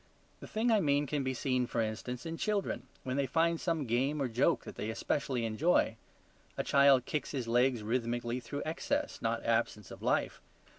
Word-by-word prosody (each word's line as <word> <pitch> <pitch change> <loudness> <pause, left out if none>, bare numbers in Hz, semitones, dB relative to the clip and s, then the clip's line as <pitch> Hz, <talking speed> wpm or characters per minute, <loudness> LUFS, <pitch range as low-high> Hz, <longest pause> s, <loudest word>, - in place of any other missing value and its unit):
The - - -9
thing 230 +2 +1
I 220 - +5
mean 145 -4 +2
can 145 0 -1
be 130 0 -1
seen, 125 -1 0
for 120 - -2
instance, 115 +4 -3
in 165 0 -3
children, 205 +2 -1 0.2
when 130 +1 -2
they 140 -1 +1
find 165 +4 +1
some 165 -5 0
game 130 +6 +1
or 135 - +1
joke 120 0 +2
that - - -8
they 110 - -4
specially 130 -5 -1
enjoy. 115 +1 +2 0.6
A - - 0
child 140 -2 +5
kicks 150 - -2
his 130 -4 -2
legs 120 -1 +2
rhythmically 120 +1 -1
through 145 +3 -5
excess, 285 - -2
not 115 0 -1
absence, 115 -3 0
of - - -10
life. - - 0
130 Hz, 190 wpm, -32 LUFS, 120-150 Hz, 0.6 s, I